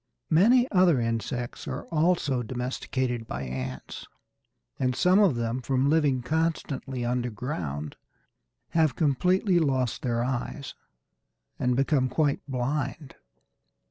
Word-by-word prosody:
Many 240 Hz, +10 st, +5 dB
other 180 Hz, -7 st, +4 dB
insects 120 Hz, +1 st, -3 dB
are 130 Hz, 0 st, -4 dB
also 155 Hz, -5 st, +1 dB
domesticated 125 Hz, 0 st, -3 dB
by 65 Hz, +3 st, -4 dB
ants, 65 Hz, 0 st, -6 dB, 0.7 s
and 125 Hz, -1 st, +1 dB
some 180 Hz, +7 st, +4 dB
of 195 Hz, -10 st, +4 dB
them, 120 Hz, +2 st, -2 dB
from 130 Hz, +3 st, +1 dB
living 145 Hz, -6 st, +2 dB
constantly 145 Hz, -5 st, -2 dB
underground, 115 Hz, -, -3 dB, 0.7 s
have 160 Hz, -5 st, +2 dB
completely 180 Hz, -, +2 dB
lost 130 Hz, -6 st, 0 dB
their 120 Hz, -2 st, 0 dB
eyes 130 Hz, +2 st, -4 dB, 0.9 s
and 125 Hz, 0 st, +1 dB
become 135 Hz, -1 st, +2 dB
quite 145 Hz, +1 st, +1 dB
blind. 135 Hz, +2 st, -3 dB
130 Hz, 110 wpm, -27 LUFS, 120-155 Hz, 0.9 s, Many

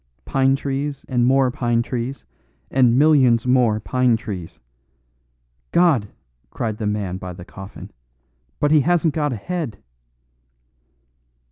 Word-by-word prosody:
Pine 135 Hz, 0 st, +2 dB
trees 140 Hz, +1 st, -4 dB
and 120 Hz, -2 st, +1 dB
more 130 Hz, -1 st, +3 dB
pine 120 Hz, -1 st, 0 dB
trees 125 Hz, +2 st, -5 dB, 0.5 s
and 125 Hz, -2 st, +4 dB
millions 135 Hz, -6 st, +4 dB
more 125 Hz, -4 st, +3 dB
pine 125 Hz, +1 st, +1 dB
trees 95 Hz, -7 st, -7 dB, 0.6 s
" -, -, -46 dB
"God!" 160 Hz, -12 st, +3 dB, 0.4 s
cried 110 Hz, -, -3 dB
the 110 Hz, -2 st, -3 dB
man 100 Hz, -3 st, -2 dB
by 90 Hz, -1 st, -7 dB
the 85 Hz, 0 st, -11 dB
coffin, 95 Hz, +1 st, -11 dB, 0.7 s
"but 145 Hz, -, +2 dB
he 155 Hz, -, +6 dB
hasn't 170 Hz, 0 st, +2 dB
got 150 Hz, -1 st, 0 dB
a -, -, -2 dB
head." 145 Hz, -, -4 dB
125 Hz, 130 wpm, -21 LUFS, 105-135 Hz, 0.7 s, he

